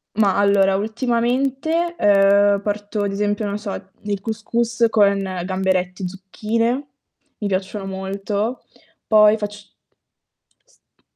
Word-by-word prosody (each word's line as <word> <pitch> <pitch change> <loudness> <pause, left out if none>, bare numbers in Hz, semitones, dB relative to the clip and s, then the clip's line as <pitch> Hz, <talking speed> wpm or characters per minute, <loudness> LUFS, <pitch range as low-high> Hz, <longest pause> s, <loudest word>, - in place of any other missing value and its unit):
Ma 205 -3 +2
allora 200 -1 +4
ultimamente, 255 - 0
ehm, 200 0 +4
porto, 205 0 -3
ad 200 -1 -1
esempio, 205 +1 -1
non 200 0 -2
so, 205 -2 -5 0.3
il 205 -1 -3
cous 220 +1 -5
cous 235 +1 +1
con 200 -2 +4 0.3
gamberetti, 185 -1 -1
zucchine, 225 +7 -2 0.5
mi 210 - -3
piacciono 195 +1 -3
molto. 200 +4 -3 0.4
Poi 210 0 +6
facc 205 0 -7 0.9
pasta - - -34
205 Hz, 115 wpm, -21 LUFS, 195-230 Hz, 0.9 s, Poi